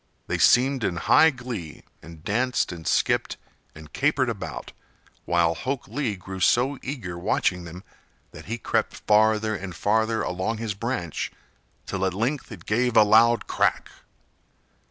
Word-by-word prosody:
They -, -, -2 dB
seemed 130 Hz, 0 st, +4 dB
in 90 Hz, -, 0 dB
high 160 Hz, -, +5 dB
glee 125 Hz, -, -7 dB, 0.2 s
and 80 Hz, -2 st, -13 dB
danced 120 Hz, +4 st, 0 dB
and 85 Hz, -2 st, -8 dB
skipped -, -, +1 dB, 0.4 s
and 80 Hz, 0 st, -13 dB
capered 140 Hz, -3 st, +1 dB
about, 100 Hz, -5 st, -6 dB, 0.5 s
while 85 Hz, -1 st, +2 dB
Hok 130 Hz, +9 st, -4 dB
Lee 130 Hz, -8 st, -2 dB
grew 95 Hz, +1 st, -8 dB
so 125 Hz, +9 st, +2 dB
eager 100 Hz, -11 st, -6 dB
watching 90 Hz, -1 st, 0 dB
them 90 Hz, +3 st, -10 dB, 0.5 s
that -, -, -12 dB
he 115 Hz, +4 st, -4 dB
crept -, -, -1 dB
farther 110 Hz, +1 st, +2 dB
and 95 Hz, -3 st, -7 dB
farther 110 Hz, +4 st, +1 dB
along 95 Hz, +5 st, -2 dB
his 110 Hz, -2 st, -3 dB
branch 100 Hz, -, -3 dB, 0.5 s
till 95 Hz, -, -3 dB
at 95 Hz, -1 st, 0 dB
length 125 Hz, +8 st, -2 dB
it 95 Hz, -7 st, -10 dB
gave 120 Hz, +2 st, +1 dB
a 110 Hz, -, +9 dB
loud 115 Hz, +2 st, +4 dB
crack. -, -, 0 dB
110 Hz, 150 wpm, -25 LUFS, 90-120 Hz, 0.5 s, a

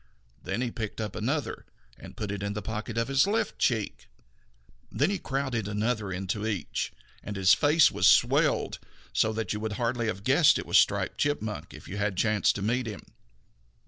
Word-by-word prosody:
Then 95 Hz, +6 st, -3 dB
he 125 Hz, -2 st, -1 dB
picked 110 Hz, -2 st, -5 dB
up 110 Hz, -1 st, -4 dB
another 140 Hz, +6 st, -2 dB, 0.3 s
and -, -, -13 dB
put 105 Hz, -, -4 dB
that 100 Hz, -1 st, -4 dB
in 100 Hz, 0 st, -2 dB
the 105 Hz, -, -5 dB
pocket 110 Hz, +1 st, -5 dB
in 115 Hz, -, +2 dB
his 135 Hz, +6 st, +3 dB
left 220 Hz, +1 st, -1 dB
cheek. 110 Hz, -5 st, -1 dB, 0.8 s
Then 150 Hz, +8 st, +1 dB
he 200 Hz, -, -2 dB
crowded 130 Hz, -6 st, -2 dB
another 105 Hz, 0 st, -1 dB
into 95 Hz, +4 st, -3 dB
each; 105 Hz, -5 st, -3 dB, 0.3 s
and 105 Hz, -, -6 dB
his 95 Hz, -1 st, +5 dB
face 155 Hz, +1 st, +5 dB
was -, -, +3 dB
swelled -, -, +3 dB, 0.3 s
so 110 Hz, -, +2 dB
that 110 Hz, 0 st, -2 dB
you 105 Hz, -, -3 dB
would 110 Hz, 0 st, -3 dB
hardly 115 Hz, +1 st, -1 dB
have 100 Hz, -2 st, -3 dB
guessed -, -, +5 dB
that -, -, -1 dB
it -, -, -11 dB
was -, -, +6 dB
Striped -, -, +1 dB
Chipmunk 110 Hz, -8 st, -2 dB
if -, -, -12 dB
you 100 Hz, -, -6 dB
had 100 Hz, -2 st, -1 dB
chanced 105 Hz, 0 st, +2 dB
to 100 Hz, -, -4 dB
meet 120 Hz, +3 st, 0 dB
him. 105 Hz, -3 st, -7 dB
110 Hz, 195 wpm, -28 LUFS, 105-125 Hz, 0.8 s, was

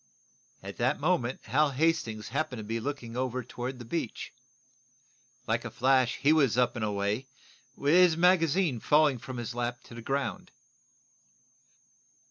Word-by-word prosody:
At -, -, -8 dB
that -, -, +1 dB
moment -, -, 0 dB
Hal 145 Hz, +6 st, +2 dB
Hastings 130 Hz, -8 st, 0 dB
happened 135 Hz, -4 st, -2 dB
to -, -, -6 dB
be 115 Hz, +2 st, -3 dB
looking 120 Hz, -2 st, -5 dB
over 130 Hz, 0 st, -2 dB
toward 125 Hz, +2 st, -6 dB
the 120 Hz, -, -9 dB
beach. 125 Hz, -2 st, -4 dB, 1.1 s
Like -, -, 0 dB
a -, -, -5 dB
flash 130 Hz, -1 st, +2 dB
he 145 Hz, +3 st, +3 dB
was 140 Hz, -7 st, +3 dB
up 125 Hz, -1 st, +2 dB
and 120 Hz, -, -3 dB
away, 105 Hz, +4 st, -1 dB, 0.5 s
his 165 Hz, +3 st, +5 dB
magazine 170 Hz, -5 st, +3 dB
falling 145 Hz, 0 st, +3 dB
from 130 Hz, +2 st, -7 dB
his 120 Hz, 0 st, -4 dB
lap 120 Hz, 0 st, -3 dB
to -, -, -14 dB
the 115 Hz, -, -8 dB
ground. 135 Hz, +3 st, -3 dB
130 Hz, 145 wpm, -29 LUFS, 120-150 Hz, 1.1 s, his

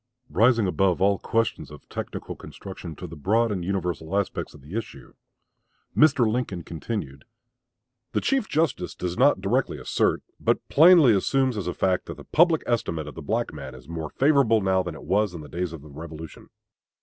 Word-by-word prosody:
Rising 115 Hz, -1 st, +4 dB
above 95 Hz, -1 st, +1 dB
all 100 Hz, 0 st, +3 dB
questions 115 Hz, -9 st, -1 dB
of 75 Hz, -2 st, -13 dB
technical -, -, -6 dB
construction 90 Hz, -4 st, -9 dB
to 90 Hz, -, -8 dB
the 85 Hz, -1 st, -8 dB
broad 110 Hz, +9 st, +1 dB
and 95 Hz, -4 st, -2 dB
universal 90 Hz, -1 st, -2 dB
aspects 100 Hz, -5 st, -2 dB
of 75 Hz, -, -14 dB
the 75 Hz, +9 st, -9 dB
issue, 115 Hz, -, -6 dB, 0.8 s
Mr. 140 Hz, -5 st, +5 dB
Lincoln 110 Hz, -6 st, -2 dB
continued: 80 Hz, -, -5 dB, 0.9 s
The -, -, +1 dB
Chief 270 Hz, -5 st, 0 dB
Justice 145 Hz, -, 0 dB
does 90 Hz, -1 st, -3 dB
not 130 Hz, -5 st, +4 dB
directly 120 Hz, +7 st, 0 dB
assert, -, -, 0 dB, 0.2 s
but -, -, 0 dB
plainly 160 Hz, -5 st, +7 dB
assumes 130 Hz, +5 st, +1 dB
as 100 Hz, -4 st, -3 dB
a 90 Hz, -, -1 dB
fact, 95 Hz, -1 st, 0 dB
that -, -, -7 dB
the -, -, -10 dB
public 165 Hz, -1 st, +3 dB
estimate 85 Hz, -10 st, -1 dB
of 75 Hz, -, -8 dB
the 80 Hz, -, -8 dB
black 110 Hz, +6 st, -1 dB
man 70 Hz, -3 st, -8 dB
is 65 Hz, 0 st, -14 dB
more 80 Hz, -2 st, -5 dB
favorable 135 Hz, -6 st, +3 dB
now 95 Hz, -2 st, +2 dB
than 85 Hz, -3 st, -5 dB
it -, -, -11 dB
was 100 Hz, -1 st, +1 dB
in 80 Hz, -, -6 dB
the 75 Hz, -, -10 dB
days 90 Hz, +1 st, -3 dB
of 80 Hz, -4 st, -9 dB
the 75 Hz, -, -13 dB
Revolution. 80 Hz, +1 st, -9 dB
95 Hz, 185 wpm, -25 LUFS, 80-115 Hz, 0.9 s, plainly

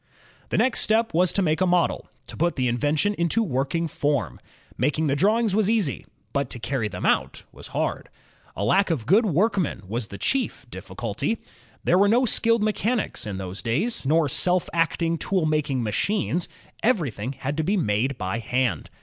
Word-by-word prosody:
The -, -, 0 dB
next 255 Hz, -2 st, +2 dB
step 225 Hz, +1 st, +2 dB
was 180 Hz, +2 st, +3 dB
to 195 Hz, -, +2 dB
make 160 Hz, +1 st, +1 dB
a 185 Hz, -, +4 dB
model, 175 Hz, -1 st, +1 dB, 0.2 s
to -, -, -10 dB
put 170 Hz, +1 st, 0 dB
the 130 Hz, -2 st, 0 dB
invention 145 Hz, -, +1 dB
into 170 Hz, +7 st, +2 dB
working 150 Hz, -, -1 dB
form. 140 Hz, -, -1 dB, 0.4 s
Making 150 Hz, +5 st, 0 dB
the 140 Hz, -2 st, +1 dB
drawings 215 Hz, +5 st, +2 dB
was 215 Hz, -1 st, +3 dB
easy, 215 Hz, -, 0 dB, 0.3 s
but 140 Hz, -3 st, 0 dB
to 120 Hz, -, -5 dB
carry 115 Hz, -1 st, -1 dB
them -, -, -5 dB
out -, -, +1 dB
was -, -, -10 dB
hard. -, -, -3 dB, 0.5 s
A 100 Hz, -, -3 dB
lack 190 Hz, -, +3 dB
of 145 Hz, -10 st, -1 dB
good 210 Hz, -, +4 dB
workmen 185 Hz, -, +1 dB
was 115 Hz, +2 st, -3 dB
the 100 Hz, -, -8 dB
chief 270 Hz, -, -1 dB
difficulty. 225 Hz, -, -3 dB, 0.5 s
There 180 Hz, -, +3 dB
were 200 Hz, +1 st, +5 dB
no 245 Hz, +4 st, +4 dB
skilled 230 Hz, -1 st, +2 dB
mechanics 215 Hz, -, -1 dB
in 100 Hz, -2 st, -4 dB
those 95 Hz, 0 st, -5 dB
days, 160 Hz, -, -1 dB
nor 155 Hz, +3 st, +3 dB
self 180 Hz, +6 st, +1 dB
acting 165 Hz, 0 st, 0 dB
tool 185 Hz, -4 st, 0 dB
making 150 Hz, -5 st, 0 dB
machines; 175 Hz, -, -1 dB, 0.3 s
everything 140 Hz, -, 0 dB
had 140 Hz, +2 st, -4 dB
to 160 Hz, -, +1 dB
be 200 Hz, +6 st, +1 dB
made 120 Hz, -, 0 dB
by 95 Hz, +3 st, -2 dB
hand. 115 Hz, -, -1 dB
160 Hz, 180 wpm, -24 LUFS, 125-200 Hz, 0.5 s, were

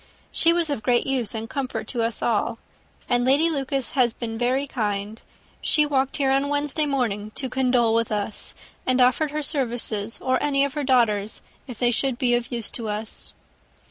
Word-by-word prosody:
She 335 Hz, -, +4 dB
was 335 Hz, -3 st, +1 dB
of 280 Hz, -, -2 dB
great 240 Hz, +2 st, +2 dB
use 250 Hz, -5 st, -1 dB
and 220 Hz, 0 st, -4 dB
comfort 265 Hz, +1 st, -4 dB
to 240 Hz, -, -1 dB
us 230 Hz, 0 st, -1 dB
all, 230 Hz, 0 st, +1 dB, 0.5 s
and 245 Hz, -1 st, +2 dB
Lady 285 Hz, +6 st, +4 dB
Lucas 275 Hz, -3 st, -1 dB
has 250 Hz, -6 st, +2 dB
been 225 Hz, -2 st, -5 dB
very 250 Hz, +4 st, +1 dB
kind: 210 Hz, -4 st, -3 dB, 0.4 s
she 300 Hz, -, +3 dB
walked 270 Hz, -2 st, 0 dB
here 275 Hz, -2 st, +2 dB
on 275 Hz, +1 st, +2 dB
Wednesday 290 Hz, +1 st, +1 dB
morning 225 Hz, -7 st, -1 dB
to 265 Hz, -, -1 dB
condole 250 Hz, -3 st, +2 dB
with 230 Hz, -1 st, +1 dB
us, 210 Hz, 0 st, -1 dB, 0.3 s
and 255 Hz, 0 st, +3 dB
offered 255 Hz, +5 st, +4 dB
her 300 Hz, +1 st, -3 dB
services, 235 Hz, -7 st, -1 dB
or 255 Hz, 0 st, 0 dB
any 280 Hz, -1 st, +2 dB
of 280 Hz, -, -4 dB
her 295 Hz, -1 st, -2 dB
daughters, 225 Hz, -6 st, +2 dB, 0.2 s
if 250 Hz, -4 st, -8 dB
they 240 Hz, 0 st, +2 dB
could 260 Hz, +1 st, +1 dB
be 245 Hz, -1 st, +2 dB
of 240 Hz, +1 st, 0 dB
use 235 Hz, -3 st, -2 dB
to 225 Hz, -3 st, -4 dB
us." 210 Hz, +1 st, -5 dB
250 Hz, 190 wpm, -24 LUFS, 230-275 Hz, 0.5 s, She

